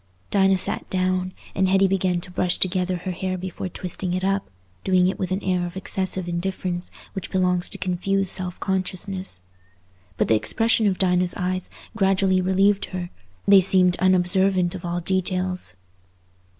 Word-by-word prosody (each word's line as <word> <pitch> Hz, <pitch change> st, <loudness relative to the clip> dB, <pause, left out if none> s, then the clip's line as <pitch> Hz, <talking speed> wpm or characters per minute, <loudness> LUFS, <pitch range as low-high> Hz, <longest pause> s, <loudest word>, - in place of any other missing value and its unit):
Dinah 195 Hz, -1 st, +4 dB
sat -, -, +1 dB
down, 185 Hz, 0 st, 0 dB, 0.2 s
and 190 Hz, 0 st, +1 dB
Hetty 195 Hz, +1 st, +4 dB
began 185 Hz, -2 st, 0 dB
to 180 Hz, -, -6 dB
brush 180 Hz, -1 st, +1 dB
together 185 Hz, 0 st, 0 dB
her 185 Hz, +2 st, -5 dB
hair 185 Hz, +1 st, -3 dB
before 185 Hz, 0 st, -5 dB
twisting 180 Hz, +1 st, -4 dB
it 185 Hz, -, -3 dB
up, 195 Hz, +1 st, 0 dB, 0.3 s
doing 185 Hz, -1 st, +3 dB
it 190 Hz, -, -2 dB
with 185 Hz, -, -2 dB
that 190 Hz, +2 st, -2 dB
air 180 Hz, -1 st, 0 dB
of 175 Hz, +1 st, -5 dB
excessive 190 Hz, -1 st, -1 dB
indifference 175 Hz, 0 st, -3 dB, 0.2 s
which 195 Hz, -, -5 dB
belongs 180 Hz, -1 st, +1 dB
to -, -, +3 dB
confused 195 Hz, +1 st, 0 dB
self 185 Hz, -1 st, -4 dB
consciousness. 190 Hz, -, -3 dB, 0.8 s
But -, -, +1 dB
the -, -, +3 dB
expression 225 Hz, -, +2 dB
of 190 Hz, -2 st, +1 dB
Dinah's 180 Hz, -1 st, +2 dB
eyes 185 Hz, 0 st, -2 dB, 0.3 s
gradually 195 Hz, -2 st, +2 dB
relieved 195 Hz, +2 st, +2 dB
her; 180 Hz, -2 st, -6 dB, 0.4 s
they 195 Hz, -1 st, +8 dB
seemed 180 Hz, -1 st, +4 dB
unobservant 185 Hz, 0 st, +2 dB
of -, -, -7 dB
all 175 Hz, 0 st, -2 dB
details. 185 Hz, -, -1 dB
185 Hz, 160 wpm, -23 LUFS, 180-190 Hz, 0.8 s, they